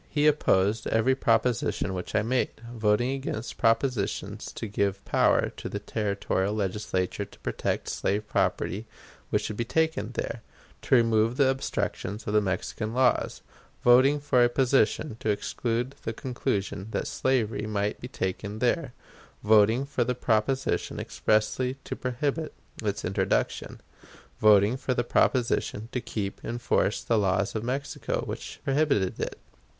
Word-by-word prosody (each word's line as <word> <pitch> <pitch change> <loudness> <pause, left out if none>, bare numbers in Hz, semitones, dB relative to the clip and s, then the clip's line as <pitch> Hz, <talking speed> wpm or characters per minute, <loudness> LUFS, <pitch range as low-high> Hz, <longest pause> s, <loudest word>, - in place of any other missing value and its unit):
He 150 0 +1
opposed 110 -8 +3
every 115 +4 +3
proposition 120 -6 +1
which 90 -1 -5
I 110 - +3
made, 125 +1 0
voting 110 +2 +2
against 135 -4 -4
propositions 115 -4 0
to - - -5
give 100 -2 -1
power - - +3
to - - -5
a - - -2
Territorial 100 -1 -1
Legislature 95 -2 -1
to - - -14
protect - - -2
slave 105 +2 -1
property 110 +4 0 0.4
which - - +1
should 105 - -4
be 120 - 0
taken 160 +6 0
there; - - -4 0.4
to - - +3
remove 115 0 +3
the 140 -2 +4
obstructions 115 -5 -2
of 105 - -2
the 105 - +5
Mexican 105 +4 -3
laws; 130 -1 +2 0.4
voting 130 +4 +6
for 135 -4 +3
a 120 - +4
proposition 125 -1 +2
to - - -2
exclude 120 +4 -1
the 115 - -3
conclusion 110 -6 -3
that - - -2
slavery 115 -5 0
might 105 -1 -1
be 125 - -5
taken 100 -1 -3
there; 125 +3 0 0.5
voting 110 +4 +5
for 140 -3 0
the 125 +1 -1
proposition 125 +3 0
expressly 110 +4 0
to - - -5
prohibit 140 +5 -2 0.3
its - - -2
introduction; - - -1 0.6
voting 105 +2 +5
for 130 -1 -1
the 120 - +1
proposition 115 -3 +1
to 125 - -2
keep 105 -5 -4
in 120 - -3
force 115 -3 +1
the 115 -2 +2
laws 100 0 +1
of 110 - -3
Mexico 135 +4 -2
which - - -6
prohibited 135 -9 +1
it. - - -3
115 Hz, 145 wpm, -27 LUFS, 105-130 Hz, 0.6 s, voting